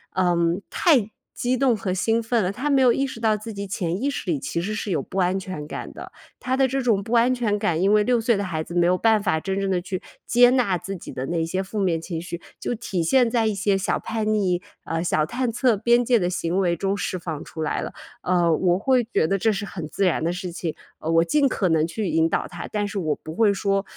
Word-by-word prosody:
嗯， 175 0 +2
太 255 - +3 0.2
激 250 +1 0
动 260 -2 +3
和 195 -4 -2
兴 225 +5 +1
奋 230 -2 +1
了， 180 - 0
她 255 +9 -3
没 275 -2 +4
有 250 -2 +6
意 275 - 0
识 245 - -8
到 220 -2 +2
自 215 +1 -7
己 200 0 -5
潜 185 -1 -3
意 280 - +1
识 210 - -4
里 145 - 0
其 135 +6 -3
实 215 +4 -3
是 210 -2 -3
有 - - +1
不 195 - -8
安 185 +1 +2
全 185 -6 -6
感 - - -6
的。 - - -10 0.3
她 255 +1 -1
的 265 -1 +3
这 270 +1 -1
种 215 -5 +1
不 225 - -5
安 240 +2 +4
全 230 -5 0
感 180 -5 0
因 195 +2 +3
为 210 0 +5
6 240 0 +2
岁 225 -2 +2
的 200 - -1
孩 160 -4 -3
子 170 - -9
没 175 0 +4
有 180 +1 +3
办 220 0 +3
法 180 -6 +1
真 195 +4 -2
正 195 -1 -1
地 180 -1 +1
去 185 0 -4 0.3
接 245 0 +6
纳 240 -8 +2
自 195 +3 -6
己 180 - -9
的 130 - -4
那 165 +2 -1
些 185 +3 -2
负 205 +2 -5
面 175 -4 +1
情 165 -1 -5
绪， 170 0 -6 0.2
就 245 - -2
体 200 -6 -3
现 245 +6 +3
在 230 -3 +2
一 210 - 0
些 200 0 +1
小 195 - 0
叛 220 -1 -2
逆， 185 -4 +1 0.2
呃， 165 +1 -2
小 155 -3 +1
探 240 +7 -2
测 240 0 +2
边 235 +3 +3
界 240 -1 +4
的 180 -2 0
行 175 +1 -1
为 175 -2 +2
中 195 +3 -1
释 190 -2 -3
放 160 -4 -5
出 160 - -6
来 150 - -1
了。 - - -5 0.3
呃， 175 -2 +2
我 180 0 +2
会 250 +4 +2
觉 225 -7 0
得 195 +5 +1
这 220 +3 +3
是 205 0 -3
很 170 -6 -6
自 195 - 0
然 165 -3 +1
的 170 - +1
事 180 0 -5
情， 165 -2 -4 0.2
呃， 160 - -4
我 165 0 +5
尽 280 - +2
可 190 - 0
能 160 0 +2
去 205 +4 -3
引 160 +1 +2
导 - - -1
她。 - - -7
但 205 -1 -1
是 200 -1 -4
我 155 -4 0
不 155 - -9
会 220 -3 +4
说 195 0 0
195 Hz, 285 characters per minute, -23 LUFS, 175-230 Hz, 0.3 s, 有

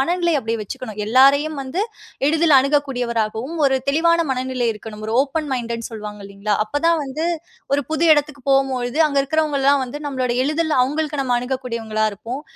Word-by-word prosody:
மனநிலை 345 +3 +1
அப்பிடியே 230 -3 -3
வச்சுக்கணும். 215 +1 -7
எல்லாரையும் 280 +6 +4
வந்து 280 +10 -2 0.5
எளிதில 315 -1 +4
அணுகக்கூடியவராகவும், 250 -2 -1
ஒரு 265 -1 +2
தெளிவான 335 +4 +3
மனநிலை 255 -2 -1
இருக்கணும். 215 0 -9
ஒரு 220 - -1
ஓப்பன் 290 +1 -3
மைண்டட்டு 235 -2 -2
ன்னு - - -6
சொல்வாங்க 210 -2 -7
இல்லேங்களா! 200 +1 -2
அப்ப 290 +6 -2
தான் 335 - +3
வந்து 290 +5 -3 0.5
ஒரு 285 - +1
புது 315 +1 +1
இடத்துக்கு 295 -2 -2
போம்பொழுது, 265 0 +1
அங்க 280 -1 0
இருக்கிறவங்கலாம் 285 -2 +2
வந்து 260 +4 -7
நம்மளோட 260 -3 -1
எளிதில் 310 +2 0
அவுங்களுக்கு 295 +2 -1
நம்ம 250 -2 +1
அணுகக்கூடியவங்களாக 230 -4 -2
இருப்போம். 235 +8 -6
270 Hz, 160 wpm, -20 LUFS, 235-295 Hz, 0.5 s, எல்லாரையும்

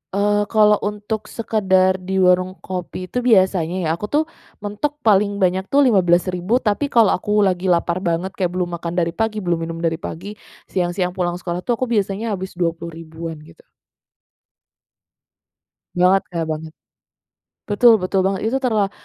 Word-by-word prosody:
eee, 205 +1 +1
kalau 210 -1 +4
untuk 210 +1 -4
sekedar 190 -4 +1
di 190 +1 -4
warung 185 0 +3
kopi 185 0 -6
itu 250 - -1
biasanya 190 -8 +2
ya, 160 - 0
aku 170 +6 -3
tuh 300 +7 +1 0.4
mentok 285 +9 -3
paling 205 -1 +3
banyak 190 -1 0
tuh 285 +1 +4
Rp15.000, 185 0 +2
Tapi 220 +6 0
kalau 230 -6 +4
aku 210 +2 +1
lagi 185 -1 0
lapar 175 0 +1
banget 175 +1 -1
kayak 180 -3 -2
belum 180 -1 -1
makan 170 +1 -5
dari 170 -2 +1
pagi, 215 +1 -2
belum 175 -2 0
minum 165 - -6
dari 165 0 0
pagi, 190 +6 -7 0.4
siang-siang 180 0 -1
pulang 175 -1 -2
sekolah 175 -1 -4
tuh 240 +6 -1
aku 245 +1 -3
biasanya 210 +1 -1
habis 190 -2 -5
Rp20.000-an 165 -1 -6 2.3
Banget 185 +2 +4
Kak, 170 -2 -3
banget. 155 0 -6 1.0
Betul 230 +3 +6
betul 190 +1 +1
banget, 195 0 -1
itu 265 - +1
terla 220 -7 0
190 Hz, 150 wpm, -20 LUFS, 175-210 Hz, 2.3 s, Betul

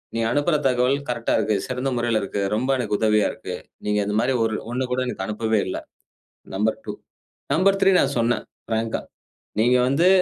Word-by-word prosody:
நீ - - 0
அனுப்புற 145 +4 +2
தகவல் 125 +2 +2
கரெக்ட்டா 115 -1 0
இருக்கு. 110 -1 +1
சிறந்த 125 +1 -2
முறையில 120 -2 +1
இருக்கு. 100 0 -3
ரொம்ப 130 +4 -1
எனக்கு 115 -4 -1
உதவியா 105 -1 +3
இருக்கு. - - -6 0.3
நீங்க 105 0 +1
இந்த 105 +1 -2
மாதிரி 130 +3 +2
ஒரு 110 -1 0 0.2
ஒண்ணு 130 +1 -1
கூட 125 - +1
எனக்கு 95 -6 -3
அனுப்பவே 110 0 0
இல்ல. 95 - -3 0.8
நம்பர் 110 +3 +1
2. - - -4 0.6
நம்பர் 195 +3 +4
3 195 - +6
நான் 140 - +2
சொன்னேன். 120 +1 +1 0.3
பிராங்க்கா, 115 0 -1 0.6
நீங்க 125 +3 +4
வந்து, 165 +7 +4
120 Hz, 175 wpm, -23 LUFS, 110-130 Hz, 0.8 s, 3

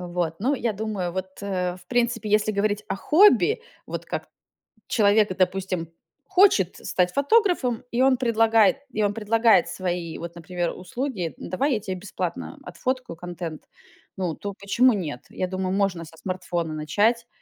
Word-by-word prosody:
Вот. 175 -2 -2
Ну, 270 +6 +2
я 235 -3 -1
думаю, 200 -4 -3
вот, 190 0 -3
э, 180 -2 -2
в - - -18
принципе, 235 -2 0
если 215 0 +3
говорить 205 +1 0
о 190 - -1
хобби, 305 - +5 0.3
вот - - -5
как - - -4 0.6
человек, 205 -2 +3
допустим, 185 -2 0 0.4
хочет 365 - +4
стать 180 -1 0
фотографом, 285 - +2
и 240 +2 +1
он 265 -1 +5
предлагает 225 -1 +4
и 215 -1 0
он 205 0 +1
предлагает 225 +1 +3
свои, 175 -3 -3
вот 170 0 -7
например, 175 +1 -3
услуги: 185 - -4
"Н - - -8
давай 270 - +1
я 215 - 0
тебе 190 -2 -4
бесплатно 195 +2 -5
отфоткаю 255 - -3
контент", 175 -2 -6 0.5
ну, 175 -4 -2
то 200 0 -5
почему 220 +6 +3
нет? 155 -11 -4
Я 185 - -3
думаю, 185 0 -2
можно 190 -4 0
со 160 +1 -15
смартфона 175 -3 -3
начать, 210 +10 +1
200 Hz, 160 wpm, -24 LUFS, 180-230 Hz, 0.6 s, хобби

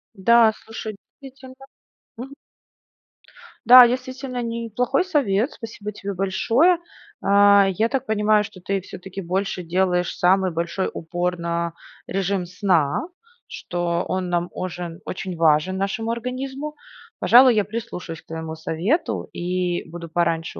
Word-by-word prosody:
Да, 225 +3 +5
слушай, 220 -1 -7 0.3
действительно, 260 -1 -12 0.6
мгм. 260 +4 -8 1.3
Да, 250 +1 +10
действительно 255 +1 -4
неплохой 235 - -1
совет, 270 - +1
спасибо 220 -2 -8
тебе 200 -1 -6
большое. 225 - +2 0.4
А, 200 0 +5
я 215 +5 0
так 265 0 -2
понимаю, 210 -1 +2
что 185 -2 -11
ты 195 +1 -2
всё-таки, 190 +1 -9
больше 185 +1 -2
делаешь 180 +1 0
самый 185 +1 +3
большой 170 +3 -2
упор 175 +2 -3
на 170 0 -2 0.3
режим 195 -1 -1
сна. 180 - 0 0.4
Что 175 -1 -2
он 185 -1 -2
нам 175 0 -1
ожен 175 -2 -6
очень 185 0 -5
важен 160 +2 +2
нашему 225 +4 -2
организму. 265 +5 -5 0.4
Пожалуй, 250 0 +6
я 210 -2 +2
прислушаюсь 200 -6 -6
к - - -41
твоему 160 0 -6
совету 170 - -1
и 175 -1 -2
буду 170 0 -8
пораньше 165 0 -1
195 Hz, 125 wpm, -22 LUFS, 175-235 Hz, 1.3 s, Да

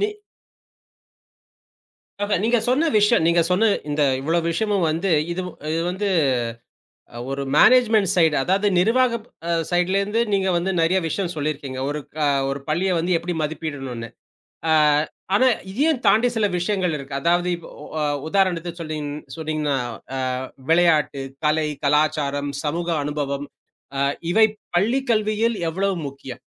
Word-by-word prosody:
நீ 410 - +2 2.2
ஆஹா, 205 0 +1
நீங்கச் 230 0 +1
சொன்ன 290 +7 +2
விஷயம் 210 -4 +4
நீங்கச் 170 -1 +3
சொன்ன 205 +5 +3 0.2
இந்த 145 +1 0 0.2
இவ்ளோ 160 +5 0
விஷயமும் 200 0 0
வந்து 170 +5 -1 0.2
இது 185 - -3 0.5
வந்து. 195 +3 -2 1.2
ஒரு 135 0 -3
மேனேஜ்மென்ட் 225 -2 +5
சைடு 160 -5 +3
அதாவது 195 +7 +1
நிர்வாகம் 235 +3 +2 0.5
சைடுலேந்து 195 +5 +1
நீங்க 195 -1 +2
வந்து 175 +2 0
நெறைய 165 +3 +3
விஷயம் 175 +2 -2
சொல்லி 155 0 -1
இருக்கீங்க. 140 -3 -8
ஒரு 150 +1 -2 0.3
அ - - +3 0.2
ஒரு 140 +1 -4
பள்ளியை 180 +5 +1
வந்து 175 +2 0
எப்டி 175 +1 -4
மதிப்பிடணும்னு. 140 -6 -5 0.6
அ - - +4 0.6
ஆனா, 255 +6 +5 0.2
இதையும் 280 +6 +1
தாண்டி 220 +5 +5
சில 215 - +3
விஷயங்கள் 180 -2 0
இருக்கு. 140 -1 -8
அதாவது 175 +1 +2
இப் 170 - -13 0.2
ஒ - - -9
அ - - +1 0.2
உதாரணத்துக்குச் 175 -2 0
சொல்றீங் 155 -2 -4 0.3
சொல்றீங்கன்னா 155 -3 -1 0.4
அ - - -2 0.5
விளையாட்டு, 165 -5 +3 0.2
கலை, 155 0 +2 0.2
கலாச்சாரம், 145 -1 +1
சமூக 170 +3 -2 0.2
அனுபவம் 145 -1 -3 0.5
அ - - +1 0.3
இவை 220 +3 +6 0.3
பள்ளி 225 +9 +2
கல்வியில் 215 +1 +1
எவ்வளவு 195 +3 -1
முக்கியம்? 135 -2 -10
175 Hz, 130 wpm, -22 LUFS, 150-205 Hz, 2.2 s, இவை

